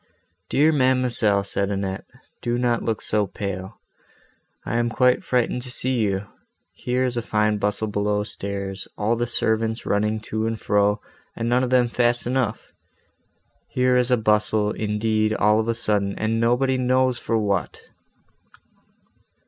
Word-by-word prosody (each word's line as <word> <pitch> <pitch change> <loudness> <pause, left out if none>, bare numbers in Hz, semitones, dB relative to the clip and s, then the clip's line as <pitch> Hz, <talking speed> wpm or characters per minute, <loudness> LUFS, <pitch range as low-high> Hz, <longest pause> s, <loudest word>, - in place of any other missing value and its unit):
"Dear 155 +3 +4
ma'amselle!" 125 -7 +3
said 100 0 -2
Annette, 95 -1 -3 0.4
"do 120 0 -1
not 120 -1 +1
look 110 -2 -2
so 105 -1 0
pale. 95 +1 -6 0.9
I 115 - -1
am 120 0 +1
quite 125 +2 +2
frightened 125 0 0
to 125 - -6
see 130 0 0
you. 100 -2 0 0.5
Here 125 +1 -1
is 125 -1 -2
a - - +1
fine 105 -1 0
bustle 105 +2 -1
below 105 0 0
stairs, 100 -1 -5
all 110 +3 +1
the 120 +1 -1
servants 110 -1 0
running 105 +2 0
to 110 +1 -2
and 115 -1 -3
fro, 105 +1 +2 0.4
and 115 - -3
none 125 +2 +2
of 125 - -1
them 125 -1 +4
fast 120 0 +1
enough! 125 -3 -2 0.9
Here 125 0 +1
is 125 0 +2
a 125 - +4
bustle, 105 -1 +1
indeed, 110 0 0
all 105 0 +3
of 110 - -1
a 115 - 0
sudden, 105 -3 0
and 110 +1 0
nobody 125 +3 +2
knows 130 0 +2
for 115 - -1
what!" 100 -4 -2
110 Hz, 155 wpm, -23 LUFS, 105-125 Hz, 0.9 s, Dear